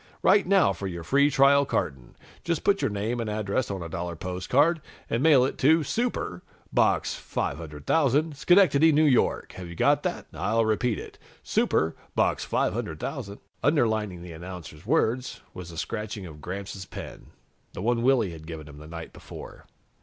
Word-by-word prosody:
"Write 200 -3 +5
now 185 - +4
for 95 +2 -5
your 85 -2 -6
free 140 - +3
trial 140 0 +5
carton. 65 - -3 0.3
Just 170 -2 -1
put 200 -1 +3
your - - +1
name 105 +4 -2
and 115 -2 -2
address 105 +3 -1
on 95 -3 -4
a - - -5
dollar 85 +1 -4
postcard, 125 - +1 0.3
and 115 - +1
mail 140 -5 +6
it 135 - -4
to 155 +4 +5
'Super,' 230 - -2 0.3
Box - - +2
500,000, 130 - -1
Schenectady, 165 -1 +5
N. 150 -2 +4
Y. - - +2
Have 90 -1 -8
you 85 - -8
got - - +3
that? - - -3
I'll 115 +1 +1
repeat 110 0 +1
it. - - -10 0.2
'Super,' 80 +1 +1 0.2
Box - - +1
500,000 100 - -2 0.2
..." - - -42
Underlining 110 - +1
the 90 - -9
announcer's 85 0 -9
words 130 -3 0
was 90 -2 -8
the 85 - -10
scratching 105 +1 -4
of 75 -3 -11
Gramps' 95 +2 -6
pen, - - -9 0.5
the - - -6
one 120 +1 +1
Willy 120 -6 +3
had 80 -1 -10
given 80 -2 -7
him 75 -1 -12
the 75 - -11
night 85 0 -8
before. - - -11
110 Hz, 170 wpm, -26 LUFS, 85-140 Hz, 0.5 s, mail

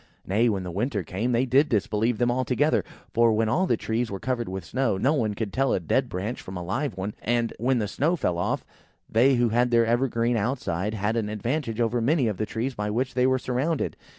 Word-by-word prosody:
Nay, 110 +5 +2
when 100 -4 -1
the 90 - -5
winter 105 +2 -1
came, 105 +9 -2
they 120 +2 +2
did 135 +4 +3
disbelieve 110 +2 +1
them 120 +1 +2
altogether; 130 +4 +1 0.3
for, 115 -1 +4
when 110 +1 +1
all 185 +11 +2
the 120 - +2
trees 115 +2 -1
were 100 - -5
covered 120 -3 -2
with 95 0 -5
snow, 130 -7 0
no 135 +9 +2
one 110 -8 0
could 100 -2 -4
tell 135 0 +2
a - - +1
dead 85 - 0
branch 100 +7 -4
from 95 0 -7
a 90 - -5
live 120 - -2
one; 100 +2 -3
and, 120 0 0
when 125 +3 +2
the 105 -3 0
snow 155 - +1
fell 90 - -1
off, - - -1 0.4
they 130 +4 +4
who 120 -1 +2
had 120 +3 +2
their 115 -1 +4
evergreen 120 0 +1
outside, 105 -4 -1
had 105 +2 -1
an 110 -3 -1
advantage 115 +3 -2
over 120 0 +1
many 135 +1 +2
of 105 -4 -2
the 110 - -2
trees 120 +4 -2
by 105 -2 -3
which 125 +5 -1
they 125 0 +3
were 130 0 +3
surrounded. 130 +5 -1
115 Hz, 235 wpm, -26 LUFS, 105-130 Hz, 0.4 s, for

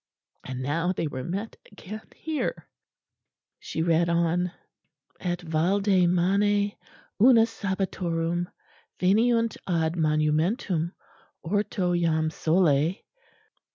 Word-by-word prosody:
And 130 0 -5
now 165 +6 0
they 180 - -2
were 130 -4 -4
met 200 - -4
again 210 +1 -8
here. 315 -2 -3 0.9
She 160 - -3
read 170 0 +2
on: 170 +1 +1 0.7
"'_Et 175 -1 -2
valde 180 +3 +2
mane 200 +3 +2 0.5
una 230 -1 +7
sabbatorum, 175 -5 -2 0.5
veniunt 230 +4 +2
ad 165 -3 +1
monumentum, 160 - +1 0.5
orto 185 0 0
jam 160 -2 +1
sole. 160 -1 +2
175 Hz, 90 wpm, -26 LUFS, 165-200 Hz, 0.9 s, una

